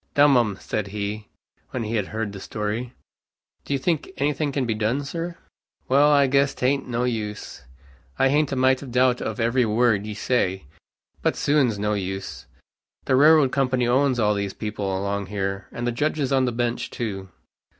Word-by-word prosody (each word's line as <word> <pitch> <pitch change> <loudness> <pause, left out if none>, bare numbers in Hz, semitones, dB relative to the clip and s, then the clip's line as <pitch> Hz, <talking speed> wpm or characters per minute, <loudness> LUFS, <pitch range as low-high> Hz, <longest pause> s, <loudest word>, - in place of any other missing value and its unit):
"Dum 145 -1 +6
'em," 110 -5 +2
said 105 -2 -3
he, 105 +1 -4 0.4
when 125 - -3
he 110 +1 -4
had 105 -4 0
heard 110 -2 -4
the 100 - -7
story. 110 +5 -4 0.7
"Do - - -8
you 140 - +2
think 155 +3 -1
any 145 +2 +1
thing 145 0 -2
can 135 -2 -1
be 115 - 0
done, 110 +6 -1
sir?" 170 +4 -5 0.5
"Wal, 140 +3 +5
I 145 -1 +5
guess 140 +1 +2
tain't 135 +2 0
no 120 0 -1
use. 110 - -4 0.5
I 135 - +3
hain't 145 +1 +2
a - - -1
mite 130 0 +3
of 135 -3 -8
doubt 125 0 +3
of 110 0 -4
every 120 +2 +2
word 110 -2 +2
you 105 - -5
say. 95 - 0 0.6
But - - +1
suin's 140 -7 +2
no 105 +1 0
use. 95 -1 -5 0.6
The 130 - +2
railroad 150 -1 +6
company 130 -3 +1
owns 130 0 +2
all 105 -2 +3
these 100 -1 -3
people 105 -2 -4
along 100 +1 -2
here, 95 -1 -3
and 120 - -4
the 120 - +1
judges 145 +2 -1
on 130 -1 +3
the 125 - 0
bench 120 0 -2
too. 95 -5 -5
120 Hz, 190 wpm, -24 LUFS, 105-135 Hz, 0.7 s, Dum